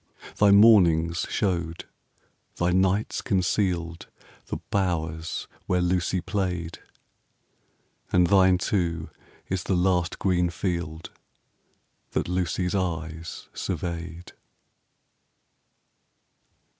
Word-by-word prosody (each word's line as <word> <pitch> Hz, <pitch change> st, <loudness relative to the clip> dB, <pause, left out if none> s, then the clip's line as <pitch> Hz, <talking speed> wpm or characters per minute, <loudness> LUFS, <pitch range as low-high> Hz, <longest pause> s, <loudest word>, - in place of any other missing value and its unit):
Thy 105 Hz, -, +5 dB
mornings 90 Hz, -6 st, +5 dB
showed, 85 Hz, -5 st, -1 dB, 0.7 s
thy 85 Hz, +1 st, +1 dB
nights 95 Hz, +3 st, +1 dB
concealed, 90 Hz, -3 st, -1 dB, 0.4 s
The -, -, -3 dB
bowers 80 Hz, -4 st, -2 dB, 0.2 s
where 90 Hz, -, +2 dB
Lucy 90 Hz, 0 st, 0 dB
played; 90 Hz, -3 st, -3 dB, 1.3 s
And 90 Hz, 0 st, +4 dB
thine 95 Hz, -1 st, +5 dB
too 85 Hz, -3 st, -1 dB, 0.4 s
is 95 Hz, -1 st, -2 dB
the 95 Hz, -, +1 dB
last 90 Hz, -1 st, +1 dB
green 90 Hz, -2 st, +1 dB
field 85 Hz, -2 st, -4 dB, 1.0 s
15 -, -, -44 dB
That -, -, 0 dB
Lucy's 90 Hz, 0 st, -1 dB
eyes 80 Hz, -4 st, -4 dB
surveyed. 85 Hz, 0 st, -5 dB
90 Hz, 85 wpm, -26 LUFS, 85-95 Hz, 1.3 s, Thy